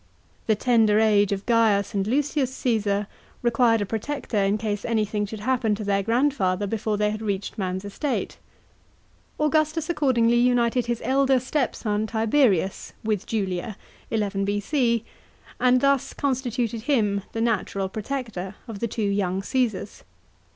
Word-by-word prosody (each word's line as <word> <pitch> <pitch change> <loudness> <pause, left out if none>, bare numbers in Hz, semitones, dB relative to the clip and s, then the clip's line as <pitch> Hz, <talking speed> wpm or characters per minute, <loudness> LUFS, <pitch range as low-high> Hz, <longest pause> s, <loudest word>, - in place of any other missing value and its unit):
The 220 - +4
tender 220 -2 +3
age 205 -2 +3
of 195 0 -2
Gaius 220 -4 +2
and 200 -1 0
Lucius 280 +1 0
Caesar 210 -4 0 0.4
required 235 -2 +3
a - - 0
protector 225 +2 -3
in 200 +2 +2
case 210 -2 -3
any 220 -2 +1
thing 210 0 -2
should 215 0 -7
happen 235 -2 +1
to 210 - -6
their 200 -1 +1
grandfather 225 -4 +1
before 215 0 -1
they 210 0 +1
had 215 +1 -5
reached 200 -2 -3
man's 190 0 -2
estate. 260 +7 -3 1.0
Augustus 310 +1 +1
accordingly 240 -7 +2
united 240 0 +2
his 240 -1 -2
elder 270 0 +3
stepson 235 -5 -1
Tiberius 220 - +1
with 215 -3 -1
Julia 195 -1 -2 0.3
(11 205 -3 -1
B.C.), 230 +3 0 0.5
and 250 0 +4
thus 275 -1 +2
con 280 -2 0
stituted 240 -3 -2
him 215 -6 +1
the 225 - -2
natural 210 -4 0
protector 215 -3 -5
of 220 -4 -7
the 235 - -1
two 220 0 -3
young 195 -2 0
Cassars. 250 0 -2
220 Hz, 145 wpm, -24 LUFS, 205-250 Hz, 1.0 s, The